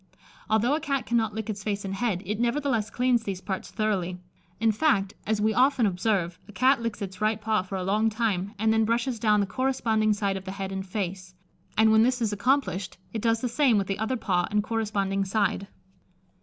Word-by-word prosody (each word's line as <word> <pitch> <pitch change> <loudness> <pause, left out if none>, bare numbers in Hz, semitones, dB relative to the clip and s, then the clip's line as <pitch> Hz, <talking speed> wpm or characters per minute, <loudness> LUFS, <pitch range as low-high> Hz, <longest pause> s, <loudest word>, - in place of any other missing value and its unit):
Although 220 +5 +3
a 305 - +1
Cat 275 -3 -2
cannot 230 -3 0
lick 220 -1 -4
its 210 -2 -4
face 200 -1 -2
and 195 - -3
head, 195 -3 -1
it 210 +3 -3
nevertheless 240 -3 0
cleans 250 0 +2
these 195 -4 -4
parts 190 0 -5
thoroughly; 195 -5 -1 0.4
in 225 0 +3
fact, 205 -5 +1
as 215 -1 +1
we 215 +1 +2
often 255 -1 +3
observe, 180 -3 0
a - - -11
Cat 255 +3 +3
licks 230 -2 -3
its 190 0 -8
right 215 0 +1
paw 215 -1 +1
for 185 +1 -7
a 185 - -2
long 210 +4 +2
time, 210 -4 -1
and 220 +2 +2
then 225 0 +3
brushes 235 +2 0
down 210 -1 +3
the - - +1
corresponding 220 -2 +1
side 200 -2 -1
of 190 - -9
the 190 - -5
head 195 -1 -5
and 190 0 -4
face; 185 -2 -4 0.4
and 220 0 +5
when 220 0 +6
this 250 +2 +2
is 220 -3 0
accomplished, 205 -5 0 0.2
it 220 - -3
does 225 0 +1
the 250 - 0
same 240 -1 +3
with 200 - +1
the 195 +1 -3
other 220 +4 -1
paw 180 -5 0
and 210 0 +1
corresponding 205 -3 -1
side. 195 0 0
215 Hz, 215 wpm, -26 LUFS, 195-230 Hz, 0.4 s, when